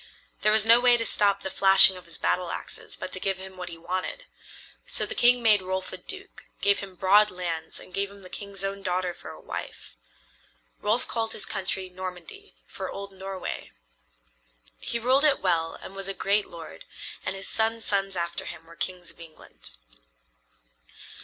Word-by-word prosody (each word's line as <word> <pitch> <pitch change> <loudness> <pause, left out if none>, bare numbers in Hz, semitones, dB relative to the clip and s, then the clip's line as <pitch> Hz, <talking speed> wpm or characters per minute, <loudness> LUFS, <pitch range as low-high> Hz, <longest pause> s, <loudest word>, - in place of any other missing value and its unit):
There 215 - +4
was 215 0 +4
no 230 +1 +8
way 245 -1 +6
to 230 - -1
stop 200 -2 +3
the 190 - -3
flashing 195 0 +7
of 180 - -11
his 170 - -11
battle 180 -1 0
axes - - -7
but 185 - -6
to 185 - -4
give 195 0 -1
him 190 0 -9
what 180 -1 -6
he 165 - -9
wanted. 185 - -4 0.6
So - - +2
the - - -3
king 245 0 +4
made 210 -3 +6
Rolf 185 0 -3
a - - -4
duke, 385 - -9
gave 200 0 +3
him 195 -2 -8
broad 205 +3 +5
lands 170 -3 -4
and 185 - -14
gave 200 +1 -1
him 200 -1 -14
the - - -10
king's 200 -1 -6
own 195 0 -3
daughter 180 -1 -1
for - - -10
wife. - - -7 0.8
Rolf 225 +4 +1
called 225 -1 -2
his - - -2
country 190 0 -2
Normandy, 180 - -8
for - - -6
old 200 0 -6
Norway. 190 0 -5 1.1
He - - -2
ruled 255 +5 +3
it 295 -3 +5
well 165 -3 +1
and 195 - -10
was 195 0 -4
a 195 - -3
great 200 +2 +2
lord, 165 -2 -10 0.4
and 185 - -2
his 195 0 -3
sons' 225 0 0
sons 195 -1 0
after 170 -1 -2
him 165 -1 -8
were 165 0 -14
kings 180 +1 -5
of - - -23
England. 165 -2 -14
195 Hz, 185 wpm, -27 LUFS, 180-210 Hz, 1.1 s, no